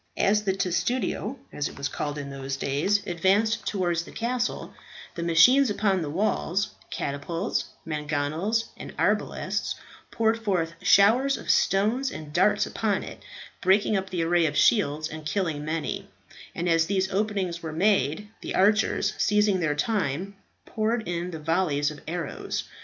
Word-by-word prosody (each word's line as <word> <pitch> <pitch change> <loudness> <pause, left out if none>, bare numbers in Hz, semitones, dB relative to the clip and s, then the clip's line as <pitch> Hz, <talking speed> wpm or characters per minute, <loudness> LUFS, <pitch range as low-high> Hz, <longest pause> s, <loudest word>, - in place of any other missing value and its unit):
As 210 +1 +2
the 190 - +2
testudo, 215 +6 -1 0.2
as 150 - -1
it - - -13
was 140 +1 -2
called 145 0 -4
in 140 -1 -6
those 135 0 -4
days, 190 +11 0
advanced 195 +5 +1
towards 175 -4 0
the - - -12
castle, 245 +1 -2 0.4
the 170 - -5
machines 170 +12 +5
upon 200 -2 +1
the 155 - -3
walls 195 +2 0 0.2
catapults, 165 +8 -2 0.2
mangonels, 155 +8 -1
and - - -10
arbalasts - - 0 0.3
poured 225 0 0
forth 175 -6 0
showers 205 +8 +5
of - - 0
stones 220 +8 +2
and 150 -1 -8
darts 205 +4 +3
upon 210 -3 -1
it, - - -9 0.4
breaking 200 +3 +3
up 190 -1 -2
the 175 -3 -1
array 170 0 +3
of 145 0 -3
shields 155 -9 +3
and 155 -1 -7
killing 155 -3 -1
many; 155 +1 -3 0.5
and 170 - -2
as 165 -1 +3
these 190 -1 0
openings 195 -4 -1
were 160 - -5
made, 190 +1 +1
the - - -4
archers, 210 +3 +3
seizing 210 -2 +3
their 150 -4 0
time, 190 0 -1 0.3
poured 220 +1 -1
in 175 0 -2
volleys 155 -3 +1
of 150 - -11
arrows. 170 -1 -3
185 Hz, 150 wpm, -26 LUFS, 155-210 Hz, 0.5 s, machines